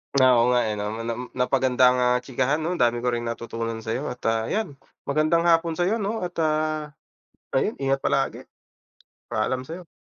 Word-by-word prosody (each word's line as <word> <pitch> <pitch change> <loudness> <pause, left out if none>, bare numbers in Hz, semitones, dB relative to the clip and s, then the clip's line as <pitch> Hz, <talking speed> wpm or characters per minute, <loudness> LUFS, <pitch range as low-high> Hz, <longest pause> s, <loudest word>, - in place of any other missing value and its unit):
Ah, 130 -3 +6
oo 120 - +4
nga, 125 0 +3
eh, 105 -1 -2
'no, 105 +1 -3
Nam 120 +2 -4
napakaganda 130 0 +3
ang, 125 - 0
ah, 125 0 +3
chikahan 130 +2 0
'no, 175 +2 -2
dami 120 0 +2
ko 125 - +2
ring 120 0 -2
natutunan 115 -1 -4
sa'yo 120 +7 -3
at, 125 0 -6
ah, 115 0 +1
'yan, 215 -6 -1 0.3
magandang 155 +4 +2
hapon 165 -1 +3
sa'yo 185 +7 +1
'no, 210 0 -2
at, 175 0 -5
ah, 155 -1 -1 0.6
ayun, 170 +11 +1
ingat 135 0 +2
palagi. - - -1 0.9
Paalam 130 +4 -1
sa'yo. 170 +5 -8
130 Hz, 180 wpm, -24 LUFS, 120-155 Hz, 0.9 s, Ah